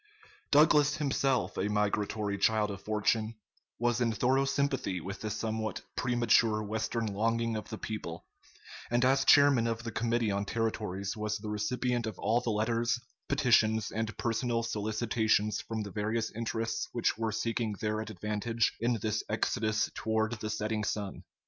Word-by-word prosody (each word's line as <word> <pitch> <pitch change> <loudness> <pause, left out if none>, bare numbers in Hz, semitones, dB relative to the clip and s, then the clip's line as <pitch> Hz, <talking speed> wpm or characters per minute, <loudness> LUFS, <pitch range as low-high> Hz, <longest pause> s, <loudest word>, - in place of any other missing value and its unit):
] 425 0 -28
Douglas, 150 0 +5
himself 135 -4 0
a 105 - 0
migratory 105 0 0
child 105 0 +2
of 100 -1 -7
fortune, 110 +2 0 0.4
was 120 +1 +1
in 115 -1 +2
thorough 130 +6 +2
sympathy 135 -8 0
with 100 +5 -7
this 110 -1 -3
somewhat 110 -2 -2
premature 115 -3 +3
Western 110 +2 -2
longing 115 +2 0
of 110 - -5
the 110 - -5
people; 95 -7 -6 0.6
and 120 +1 +2
as 135 +1 +4
chairman 140 -6 +6
of 115 0 -2
the 115 - -4
Committee 115 -1 0
on 100 0 0
Territories 105 -3 -2
was 105 0 -2
the 105 0 -7
recipient 120 +3 -1
of 105 -4 -5
all 115 +4 +1
the 120 - -2
letters, 115 +3 +1 0.3
petitions, 110 -6 +3
and 110 -1 -3
personal 115 0 0
solicitations 110 -1 0
from 110 -1 -4
the 100 - -7
various 110 +2 -1
interests 115 0 -2
which 120 - +1
were 115 0 -1
seeking 115 0 -1
their 110 +1 -2
advantage 110 +1 -1
in 120 +1 +1
this 110 0 0
exodus 110 0 0
toward 110 0 0
the 110 - -4
setting 110 0 -1
sun. 105 -2 -3
110 Hz, 155 wpm, -31 LUFS, 105-120 Hz, 0.6 s, chairman